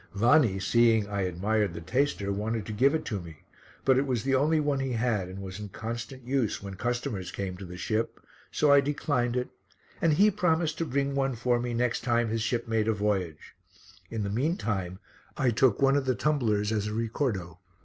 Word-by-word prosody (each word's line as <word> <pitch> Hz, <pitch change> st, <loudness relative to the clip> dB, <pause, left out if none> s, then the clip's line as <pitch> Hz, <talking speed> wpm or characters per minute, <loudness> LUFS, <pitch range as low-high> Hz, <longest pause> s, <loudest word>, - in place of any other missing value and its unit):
Vanni, 115 Hz, -1 st, +4 dB
seeing 115 Hz, +1 st, +3 dB
I 100 Hz, -1 st, -2 dB
admired 95 Hz, +1 st, 0 dB
the -, -, -5 dB
taster, 100 Hz, -, 0 dB
wanted 110 Hz, +1 st, -2 dB
to 110 Hz, -, -5 dB
give 135 Hz, +8 st, +3 dB
it 155 Hz, -, -2 dB
to 105 Hz, -4 st, -2 dB
me, 80 Hz, -4 st, -12 dB, 0.4 s
but 130 Hz, -1 st, +5 dB
it 140 Hz, -, -1 dB
was 125 Hz, -4 st, -1 dB
the 135 Hz, -, 0 dB
only 150 Hz, +4 st, +3 dB
one 145 Hz, -2 st, 0 dB
he 135 Hz, -1 st, -2 dB
had 110 Hz, -5 st, 0 dB
and 95 Hz, +1 st, -7 dB
was 95 Hz, +1 st, -7 dB
in 105 Hz, -1 st, -6 dB
constant 115 Hz, +5 st, -6 dB
use 130 Hz, -4 st, 0 dB
when 100 Hz, -1 st, -7 dB
customers 120 Hz, -2 st, -3 dB
came 95 Hz, -2 st, -4 dB
to 95 Hz, -, -8 dB
the 90 Hz, 0 st, -9 dB
ship, 110 Hz, +5 st, -2 dB, 0.3 s
so 150 Hz, -, +3 dB
I 140 Hz, 0 st, +7 dB
declined 135 Hz, -4 st, -1 dB
it 125 Hz, -, -2 dB, 0.5 s
and 165 Hz, -2 st, +4 dB
he 205 Hz, +7 st, +5 dB
promised 165 Hz, -5 st, 0 dB
to 165 Hz, -, 0 dB
bring 140 Hz, 0 st, -1 dB
one 135 Hz, -2 st, 0 dB
for 120 Hz, +1 st, +1 dB
me 120 Hz, 0 st, -3 dB
next 120 Hz, 0 st, 0 dB
time 120 Hz, -2 st, +1 dB
his 115 Hz, 0 st, -1 dB
ship 115 Hz, +1 st, -1 dB
made 110 Hz, -1 st, 0 dB
a 110 Hz, -, +3 dB
voyage; 95 Hz, -7 st, -2 dB, 0.6 s
in 110 Hz, -2 st, -3 dB
the 100 Hz, -, -2 dB
meantime 105 Hz, -, -1 dB, 0.4 s
I 130 Hz, -4 st, +2 dB
took 120 Hz, +2 st, +3 dB
one 135 Hz, 0 st, +5 dB
of 140 Hz, -2 st, +1 dB
the 130 Hz, -, +2 dB
tumblers 110 Hz, -9 st, +1 dB
as 105 Hz, -1 st, -1 dB
a 105 Hz, -, -3 dB
ricordo. 110 Hz, -, -2 dB
115 Hz, 210 wpm, -28 LUFS, 100-135 Hz, 0.6 s, I